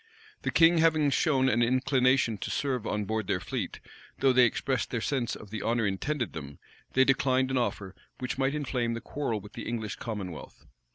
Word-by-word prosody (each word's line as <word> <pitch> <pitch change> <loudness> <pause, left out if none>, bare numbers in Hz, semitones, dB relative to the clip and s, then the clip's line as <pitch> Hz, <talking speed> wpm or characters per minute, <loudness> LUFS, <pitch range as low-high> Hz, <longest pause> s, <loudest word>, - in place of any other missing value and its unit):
The - - -2
king 165 0 +5
having 155 -3 +3
shown 135 -2 +2
an 120 -2 +2
inclination 130 -2 +2
to - - -4
serve 130 -6 -1
on 105 -1 -1
board 110 -1 -2
their 90 - 0
fleet, 85 - -4 0.4
though 135 -1 +3
they 125 -1 +6
expressed 125 +1 -1
their 120 - -2
sense 120 0 -1
of 105 - -12
the 110 - -4
honor 115 0 +1
intended 120 +6 -2
them, 70 -3 -8 0.4
they 130 0 +5
declined 130 -1 +2
an 130 - +1
offer 100 -5 -2 0.2
which 125 +1 -4
might 135 +2 +1
inflame 125 -5 -1
the - - -4
quarrel 130 -6 -3
with 105 +1 -13
the 115 - -7
English 110 -3 -3
commonwealth. 100 -8 -7
125 Hz, 190 wpm, -29 LUFS, 110-135 Hz, 0.4 s, they